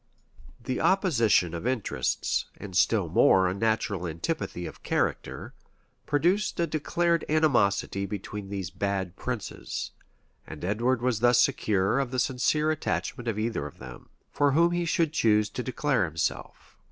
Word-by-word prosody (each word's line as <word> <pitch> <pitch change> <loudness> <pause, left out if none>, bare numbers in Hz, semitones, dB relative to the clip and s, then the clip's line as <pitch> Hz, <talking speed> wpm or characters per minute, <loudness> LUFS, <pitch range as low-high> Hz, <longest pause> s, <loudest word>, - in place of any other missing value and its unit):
The 125 +2 -3
opposition 120 - +3
of 85 +8 -4
interests, 115 - -1
and - - -9
still - - +3
more 95 -1 +4
a 90 - 0
natural 100 -3 -1
antipathy 85 - -3
of - - -9
character, - - -2 0.5
produced 180 +8 +1
a 170 - +3
declared 170 +2 0
animosity 100 -10 +2
between 100 0 -6
these 95 -3 -4
bad 95 0 -2
princes; 120 -2 -5 0.6
and 80 +1 -7
Edward 120 +5 0
was 125 -4 +1
thus 120 +1 +4
secure 105 0 +2
of 135 -3 -1
the 130 - -4
sincere 135 +5 +1
attachment 135 -5 -3
of 110 -3 -1
either 110 -9 -2
of 75 - -13
them, - - -11 0.2
for 145 -1 +2
whom 170 +3 +4
he 175 0 0
should 165 -2 +1
choose 105 -6 +2
to - - -4
declare 130 -2 0
himself. 80 0 -4
120 Hz, 145 wpm, -27 LUFS, 100-145 Hz, 0.6 s, more